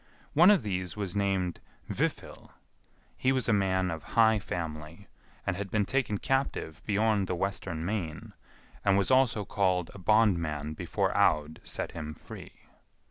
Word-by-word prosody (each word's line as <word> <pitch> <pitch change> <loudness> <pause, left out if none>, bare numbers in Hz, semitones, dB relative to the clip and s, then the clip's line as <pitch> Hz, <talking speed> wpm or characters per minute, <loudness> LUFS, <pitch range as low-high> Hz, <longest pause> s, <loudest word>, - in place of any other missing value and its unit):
One 175 +5 +7
of 205 - +5
these 95 -3 -3
was 100 -3 -3
named 95 -3 0 0.3
Vifil; - - -3 0.7
he 130 - +1
was 130 -3 0
a 115 - +3
man 95 -2 +1
of 80 -1 -5 0.2
high 110 -1 +6
family, 80 +1 -6 0.4
and - - 0
had 100 +1 -5
been 105 +1 +1
taken 130 -5 0
captive 135 - -1
beyond 105 -1 +2
the 90 - -1
western 90 -3 -3
main, 90 -6 -4 0.5
and 100 -1 +4
was 100 +5 +1
also 125 -5 +3
called 90 -4 0
a 100 - -10
bondman 85 -7 +2
before - - -1
Aud 75 +1 +2
set - - -4
him 75 -2 -6
free. - - -12
95 Hz, 150 wpm, -29 LUFS, 85-110 Hz, 0.7 s, One